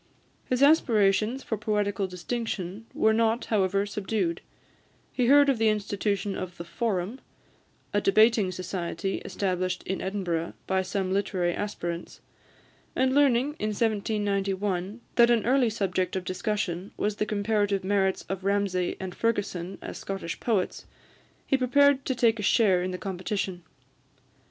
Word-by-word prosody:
His 255 Hz, +2 st, +1 dB
aspirations 230 Hz, -4 st, +3 dB
for 220 Hz, -, -2 dB
poetical 205 Hz, -2 st, 0 dB
distinction 200 Hz, +1 st, -4 dB
were 220 Hz, -, +3 dB
not, 225 Hz, +1 st, +1 dB
however, 195 Hz, -1 st, +2 dB
subdued; 200 Hz, -4 st, -2 dB, 0.7 s
he 250 Hz, -2 st, +1 dB
heard 285 Hz, +2 st, +7 dB
of 270 Hz, -5 st, +2 dB
the 225 Hz, -1 st, +4 dB
institution 205 Hz, -1 st, -1 dB
of 180 Hz, -1 st, -6 dB
the 170 Hz, -, -6 dB
Forum, 205 Hz, +3 st, -2 dB, 0.7 s
a 205 Hz, -, +2 dB
debating 215 Hz, -1 st, +4 dB
society 185 Hz, 0 st, -3 dB
established 185 Hz, -2 st, -2 dB
in 190 Hz, -, -3 dB
Edinburgh 180 Hz, -4 st, -2 dB
by 190 Hz, 0 st, +1 dB
some 190 Hz, 0 st, -2 dB
literary 185 Hz, -3 st, 0 dB
aspirants, 175 Hz, -4 st, -5 dB, 0.8 s
and 260 Hz, 0 st, +2 dB
learning, 280 Hz, 0 st, +3 dB
in 215 Hz, -, -1 dB
1791, 205 Hz, -2 st, -1 dB, 0.2 s
that 235 Hz, 0 st, +7 dB
an 235 Hz, -3 st, +3 dB
early 255 Hz, -1 st, +3 dB
subject 190 Hz, -4 st, -1 dB
of 190 Hz, -, -2 dB
discussion 185 Hz, -1 st, -2 dB
was 210 Hz, 0 st, -1 dB
the 210 Hz, -, 0 dB
comparative 205 Hz, -2 st, 0 dB
merits 190 Hz, -1 st, +1 dB
of 195 Hz, 0 st, -4 dB
Ramsay 195 Hz, -2 st, 0 dB
and 185 Hz, -1 st, -5 dB
Fergusson 195 Hz, -5 st, -2 dB
as -, -, -6 dB
Scottish 195 Hz, -4 st, -5 dB
poets, 210 Hz, -6 st, -1 dB, 0.6 s
he -, -, +2 dB
prepared 275 Hz, +2 st, +3 dB
to 260 Hz, -, 0 dB
take 230 Hz, -2 st, +3 dB
a -, -, -2 dB
share 195 Hz, -3 st, +3 dB
in 185 Hz, -, -2 dB
the 180 Hz, -, -4 dB
competition. 185 Hz, 0 st, -3 dB
200 Hz, 140 wpm, -27 LUFS, 185-225 Hz, 0.8 s, heard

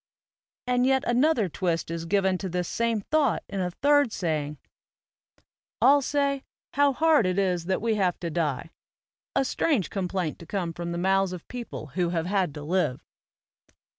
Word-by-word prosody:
And 250 Hz, 0 st, +2 dB
yet 265 Hz, 0 st, +3 dB
another 245 Hz, -2 st, +3 dB
twist 170 Hz, -1 st, -2 dB
is 165 Hz, 0 st, -4 dB
given 190 Hz, 0 st, +2 dB
to 190 Hz, -, -4 dB
this 180 Hz, 0 st, -2 dB
same 230 Hz, -2 st, 0 dB
thought 290 Hz, +1 st, +1 dB
in 200 Hz, -, -4 dB
a 180 Hz, -1 st, 0 dB
third 285 Hz, +5 st, +3 dB
saying: 150 Hz, -5 st, -2 dB, 1.2 s
"All 275 Hz, +5 st, +6 dB
say, 280 Hz, 0 st, 0 dB, 0.3 s
'How 285 Hz, 0 st, +4 dB
hard 305 Hz, -, +3 dB
it 185 Hz, 0 st, -1 dB
is 180 Hz, -4 st, +1 dB
that 190 Hz, +3 st, -1 dB
we 230 Hz, -1 st, +2 dB
have 180 Hz, -2 st, +1 dB
to 170 Hz, -2 st, -3 dB
die,' 155 Hz, -1 st, -2 dB, 0.6 s
a 270 Hz, -, +3 dB
strange 260 Hz, -, 0 dB
complaint 185 Hz, -4 st, -2 dB
to 170 Hz, -, -12 dB
come 175 Hz, -4 st, -2 dB
from 170 Hz, 0 st, -5 dB
the 170 Hz, -, -3 dB
mouths 190 Hz, +1 st, +2 dB
of 180 Hz, -, -9 dB
people 235 Hz, -, -7 dB
who 180 Hz, -2 st, 0 dB
have 165 Hz, -2 st, -1 dB
had 190 Hz, -3 st, +1 dB
to 150 Hz, -, -7 dB
live." 170 Hz, -5 st, -1 dB
190 Hz, 170 wpm, -26 LUFS, 170-250 Hz, 1.2 s, All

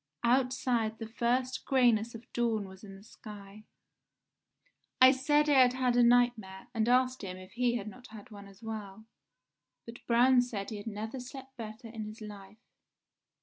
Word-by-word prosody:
Outside 245 Hz, -2 st, +1 dB
the 225 Hz, -, -6 dB
first 245 Hz, +3 st, -1 dB
greyness 235 Hz, -4 st, +2 dB
of 230 Hz, -, -9 dB
dawn 225 Hz, -4 st, 0 dB
was 190 Hz, +1 st, -14 dB
in 195 Hz, -2 st, -10 dB
the 195 Hz, -, -15 dB
sky. 210 Hz, -1 st, -12 dB, 1.3 s
"I 255 Hz, 0 st, +9 dB
said 295 Hz, +3 st, +2 dB
I 285 Hz, -2 st, +5 dB
had 250 Hz, -1 st, +4 dB
had 255 Hz, -1 st, +1 dB
a 245 Hz, -, +5 dB
nightmare, 235 Hz, -5 st, +2 dB
and 225 Hz, 0 st, 0 dB
asked 255 Hz, +1 st, +2 dB
him 185 Hz, -1 st, -6 dB
if 185 Hz, 0 st, -13 dB
he 240 Hz, 0 st, 0 dB
had 215 Hz, -3 st, -4 dB
not 250 Hz, +4 st, -11 dB
had 220 Hz, +2 st, -13 dB
one 200 Hz, -1 st, -11 dB
as 195 Hz, +2 st, -17 dB
well; 220 Hz, -1 st, -7 dB, 0.8 s
but 230 Hz, +1 st, -11 dB
Braun 245 Hz, +2 st, +5 dB
said 220 Hz, -5 st, -5 dB
he 215 Hz, -, -5 dB
had 205 Hz, +2 st, -9 dB
never 220 Hz, +4 st, -5 dB
slept 265 Hz, +1 st, -10 dB
better 225 Hz, 0 st, -8 dB
in 225 Hz, -1 st, -7 dB
his 215 Hz, +1 st, -9 dB
life. 205 Hz, -1 st, -11 dB
230 Hz, 175 wpm, -31 LUFS, 210-250 Hz, 1.3 s, I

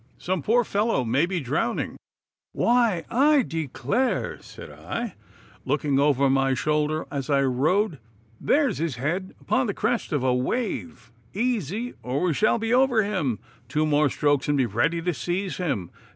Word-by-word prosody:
Some 185 Hz, -2 st, -2 dB
poor 240 Hz, -, +3 dB
fellow 205 Hz, -, 0 dB
may 130 Hz, +8 st, +1 dB
he 185 Hz, -1 st, -1 dB
drowning.' 140 Hz, +1 st, -1 dB, 0.6 s
'Why, 235 Hz, -8 st, +2 dB
I 285 Hz, +2 st, +4 dB
declare!' 160 Hz, -, -2 dB
said -, -, -11 dB
I, 235 Hz, -5 st, -5 dB, 0.5 s
looking 140 Hz, 0 st, +1 dB
over 140 Hz, -1 st, +3 dB
my 135 Hz, 0 st, +2 dB
shoulder 150 Hz, +3 st, 0 dB
as 140 Hz, -1 st, -4 dB
I 140 Hz, -1 st, +3 dB
rowed, 150 Hz, -, +1 dB, 0.4 s
'there 290 Hz, 0 st, +3 dB
is -, -, -3 dB
his 160 Hz, -5 st, -1 dB
head 170 Hz, +10 st, -3 dB
upon 260 Hz, -1 st, 0 dB
the 200 Hz, -, -2 dB
crest 230 Hz, +2 st, -1 dB
of 145 Hz, -4 st, 0 dB
a 130 Hz, -1 st, +3 dB
wave. 125 Hz, -, -3 dB, 0.2 s
Easy, 230 Hz, -, -1 dB
or 130 Hz, +3 st, -2 dB
we 180 Hz, -3 st, +2 dB
shall 215 Hz, +10 st, +2 dB
be 225 Hz, +1 st, -1 dB
over 250 Hz, -3 st, +4 dB
him! 180 Hz, -, -1 dB, 0.3 s
Two 150 Hz, +5 st, 0 dB
more 150 Hz, -1 st, +3 dB
strokes 145 Hz, 0 st, +1 dB
and 145 Hz, -, +2 dB
be 130 Hz, -, +3 dB
ready 135 Hz, +10 st, 0 dB
to 180 Hz, 0 st, 0 dB
seize 180 Hz, +7 st, -3 dB
him! 140 Hz, -, -2 dB
160 Hz, 165 wpm, -25 LUFS, 135-215 Hz, 0.6 s, I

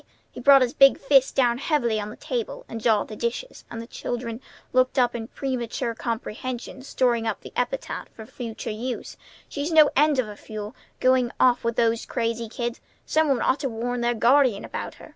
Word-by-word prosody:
He -, -, -10 dB
brought 275 Hz, +1 st, +7 dB
his 245 Hz, 0 st, -1 dB
big 275 Hz, 0 st, +6 dB
fist 270 Hz, -1 st, +3 dB
down 245 Hz, -2 st, +3 dB
heavily 245 Hz, -8 st, +1 dB
on 210 Hz, 0 st, -4 dB
the 215 Hz, -, -9 dB
table, 240 Hz, -4 st, -4 dB
and 225 Hz, -, -6 dB
jarred 215 Hz, -2 st, +2 dB
the 215 Hz, -, -8 dB
dishes; 235 Hz, -, -4 dB
and 230 Hz, -, -6 dB
the 230 Hz, -, -6 dB
children 235 Hz, 0 st, -5 dB, 0.3 s
looked 255 Hz, +2 st, +2 dB
up 245 Hz, -2 st, +3 dB
in 225 Hz, -2 st, -5 dB
premature 245 Hz, -2 st, -3 dB
comprehension, 235 Hz, +3 st, -5 dB
storing 240 Hz, -3 st, 0 dB
up -, -, -2 dB
the -, -, -11 dB
epithet -, -, -3 dB
for 220 Hz, -, -11 dB
future 230 Hz, -2 st, -6 dB
use. 240 Hz, +4 st, -5 dB, 0.3 s
"She's 290 Hz, +3 st, -3 dB
no 310 Hz, -2 st, +6 dB
end 295 Hz, 0 st, +4 dB
of 255 Hz, -4 st, +1 dB
a 210 Hz, -, -8 dB
fool, 215 Hz, +1 st, -8 dB, 0.2 s
going 255 Hz, -1 st, +3 dB
off 250 Hz, -1 st, +4 dB
with 230 Hz, 0 st, -1 dB
those 230 Hz, -1 st, +1 dB
crazy 230 Hz, -1 st, -2 dB
kids. 235 Hz, +1 st, -4 dB, 0.2 s
Some 315 Hz, 0 st, +2 dB
one 265 Hz, -3 st, +2 dB
ought 260 Hz, -, +2 dB
to 270 Hz, -2 st, -2 dB
warn 240 Hz, +2 st, -3 dB
their 240 Hz, 0 st, +1 dB
guardian 245 Hz, -2 st, +3 dB
about -, -, -6 dB
her. -, -, -14 dB
240 Hz, 200 wpm, -25 LUFS, 230-260 Hz, 0.3 s, brought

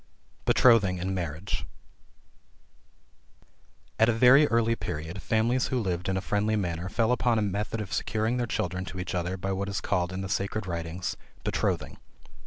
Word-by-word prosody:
BETROTHING 105 Hz, -7 st, +5 dB
AND 95 Hz, +2 st, -2 dB
MARRIAGE. 85 Hz, 0 st, -3 dB, 2.4 s
At 110 Hz, +1 st, +5 dB
a -, -, +3 dB
very 125 Hz, +6 st, +7 dB
early 115 Hz, 0 st, +2 dB
period, 80 Hz, 0 st, -5 dB
families 115 Hz, +3 st, +1 dB
who 130 Hz, -, 0 dB
lived 90 Hz, -4 st, -2 dB
in 95 Hz, -, 0 dB
a -, -, -1 dB
friendly 105 Hz, +1 st, +1 dB
manner, 90 Hz, -3 st, -2 dB
fell 115 Hz, +4 st, +1 dB
upon 120 Hz, -2 st, +2 dB
a 110 Hz, -, +2 dB
method 105 Hz, +3 st, -2 dB
of 100 Hz, -3 st, -5 dB
securing 110 Hz, +2 st, 0 dB
their 120 Hz, -1 st, -1 dB
children 90 Hz, -3 st, -2 dB
to 95 Hz, -, -7 dB
each 90 Hz, -, -4 dB
other 90 Hz, +1 st, -2 dB
by 95 Hz, +2 st, -3 dB
what 100 Hz, +1 st, -2 dB
is 100 Hz, -, -2 dB
called 90 Hz, -3 st, 0 dB
in 95 Hz, +1 st, -4 dB
the 95 Hz, -, -4 dB
sacred 100 Hz, +2 st, -2 dB
writings 85 Hz, 0 st, -3 dB, 0.3 s
Betrothing. -, -, -1 dB
100 Hz, 170 wpm, -28 LUFS, 90-115 Hz, 2.4 s, very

